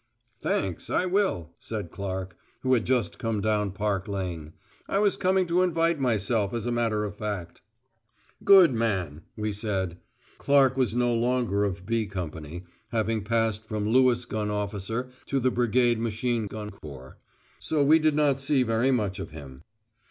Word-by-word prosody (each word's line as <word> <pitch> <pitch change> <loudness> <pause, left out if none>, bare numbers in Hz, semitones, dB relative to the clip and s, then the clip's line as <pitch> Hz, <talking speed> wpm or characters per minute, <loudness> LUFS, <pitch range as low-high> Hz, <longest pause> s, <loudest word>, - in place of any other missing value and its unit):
"Thanks, - - -2
I - - +1
will," 185 - 0
said 105 -7 -5
Clark, 95 -2 -5 0.3
who 130 0 +2
had 120 -4 +1
just 125 -3 0
come 115 -2 -1
down 105 -1 +1
Park 100 -1 -2
Lane. 90 -6 -4 0.3
"I - - 0
was 205 -1 +3
coming 185 0 +2
to 175 +1 +2
invite 165 -3 +1
myself, 110 -3 0
as 115 -1 -3
a 120 - -1
matter 115 -3 0
of 105 -1 -5
fact." 105 -5 -5 0.8
"Good 185 -8 +7
man," 95 -10 -1 0.2
we 105 -1 -2
said. 95 -4 -3 0.4
Clark 135 -2 +4
was 130 -3 0
no 120 0 +2
longer 120 -3 +1
of 95 -2 -4
"B" 115 -1 0
Company, 85 -3 -6 0.3
having 110 -2 -1
passed 110 0 0
from 105 -1 -3
Lewis 125 0 +4
gun 105 -3 -3
officer 105 +4 -3 0.2
to 135 - 0
the 130 0 +2
Brigade 120 -1 +2
Machine 115 0 -1
gun 105 0 -6
Corps. 70 -9 -11 0.4
So 150 -2 0
we 155 +3 +6
did 155 -1 +2
not 145 -3 +2
see 135 -1 +2
very 115 +2 +1
much 105 -7 0
of - - -5
him. 70 -4 -11
110 Hz, 165 wpm, -27 LUFS, 100-130 Hz, 0.8 s, Good